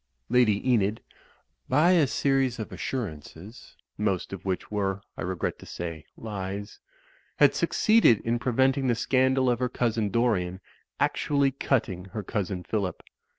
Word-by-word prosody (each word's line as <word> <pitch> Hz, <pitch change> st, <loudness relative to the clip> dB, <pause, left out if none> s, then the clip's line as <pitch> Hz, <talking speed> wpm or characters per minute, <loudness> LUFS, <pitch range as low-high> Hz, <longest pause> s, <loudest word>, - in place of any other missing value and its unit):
Lady 120 Hz, -2 st, +3 dB
Enid, 110 Hz, -3 st, +2 dB, 0.7 s
by 150 Hz, +7 st, +4 dB
a 165 Hz, -6 st, +4 dB
series 135 Hz, -2 st, +1 dB
of 110 Hz, -, -6 dB
assurances 100 Hz, -, -6 dB, 0.2 s
(most 100 Hz, -3 st, -1 dB
of 95 Hz, -, -7 dB
which 95 Hz, +1 st, -3 dB
were, 100 Hz, -2 st, -1 dB
I -, -, -7 dB
regret 90 Hz, -2 st, -3 dB
to -, -, -12 dB
say, 85 Hz, -2 st, -6 dB
lies) 100 Hz, -1 st, -6 dB, 0.6 s
had -, -, +6 dB
succeeded 215 Hz, -, +4 dB
in 120 Hz, +1 st, -1 dB
prevent 130 Hz, +3 st, +2 dB
ing 135 Hz, -, -1 dB
the 120 Hz, -, +2 dB
scandal 130 Hz, +2 st, +2 dB
of 120 Hz, -1 st, +2 dB
her 125 Hz, -1 st, 0 dB
cousin, 115 Hz, -3 st, 0 dB
Dorian, 95 Hz, -6 st, 0 dB, 0.4 s
actually 140 Hz, -2 st, +1 dB
cutting 110 Hz, -9 st, -1 dB
her 100 Hz, +2 st, -6 dB
cousin, 95 Hz, -2 st, -3 dB
Phillip. 95 Hz, -2 st, -3 dB
110 Hz, 145 wpm, -27 LUFS, 95-130 Hz, 0.7 s, had